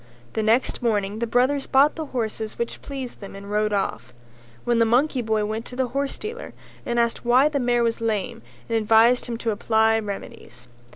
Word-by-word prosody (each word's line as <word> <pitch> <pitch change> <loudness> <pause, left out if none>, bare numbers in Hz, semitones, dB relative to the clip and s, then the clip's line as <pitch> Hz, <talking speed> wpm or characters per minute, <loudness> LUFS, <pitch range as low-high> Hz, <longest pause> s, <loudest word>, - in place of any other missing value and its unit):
The 220 - -1
next 225 +4 +1
morning 210 -3 0
the 235 - -1
brothers 260 +4 +1
bought 280 +3 +4
the 315 -2 -5
horses 220 -4 -4
which 235 - -4
pleased 270 -3 -7
them 200 -1 -9
and 200 +1 -9
rode 210 0 +1
off. 200 -10 -2 0.5
Then 240 -1 +2
the - - +6
monkey 250 +4 +2
boy 220 -2 0
went 220 +2 -3
to 250 - -10
the 255 -1 -1
horsedealer 280 - -4 0.3
and 240 0 0
asked 235 0 0
why 250 +5 +4
the 290 -2 -1
mare 240 -1 +2
was 230 0 -1
lame 215 -4 -2 0.3
and 230 - -1
advised 225 +3 +4
him 235 -1 -3
to 230 -1 -1
apply 220 +1 +2
remedies. 195 - -8
230 Hz, 190 wpm, -23 LUFS, 215-250 Hz, 0.5 s, the